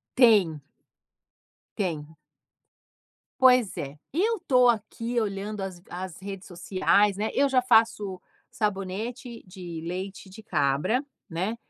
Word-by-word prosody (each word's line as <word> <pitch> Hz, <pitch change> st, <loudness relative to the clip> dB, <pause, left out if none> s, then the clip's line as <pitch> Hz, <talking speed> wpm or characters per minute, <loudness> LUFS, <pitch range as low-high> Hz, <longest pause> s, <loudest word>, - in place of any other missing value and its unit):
Tem. 205 Hz, -, +5 dB, 1.2 s
Tem. 160 Hz, -5 st, -3 dB, 1.2 s
Pois 250 Hz, -5 st, +5 dB
é, 145 Hz, +1 st, -6 dB
eu 420 Hz, -, +1 dB
tô 250 Hz, -2 st, +5 dB
aqui 230 Hz, +1 st, 0 dB
olhando 205 Hz, 0 st, -3 dB
as 190 Hz, -2 st, -5 dB
as 180 Hz, 0 st, -6 dB
redes 195 Hz, 0 st, -7 dB
sociais, 195 Hz, +2 st, +2 dB
né, 215 Hz, +1 st, -1 dB
eu 280 Hz, -, +4 dB
já 260 Hz, -2 st, +3 dB
faço 225 Hz, -5 st, +3 dB, 0.3 s
sabonete 215 Hz, +4 st, -3 dB
de 180 Hz, -3 st, -8 dB
leite 190 Hz, +3 st, -5 dB
de 195 Hz, +4 st, -12 dB
cabra, 185 Hz, -, +1 dB, 0.2 s
né, 185 Hz, +7 st, -2 dB
200 Hz, 115 wpm, -27 LUFS, 185-235 Hz, 1.2 s, Tem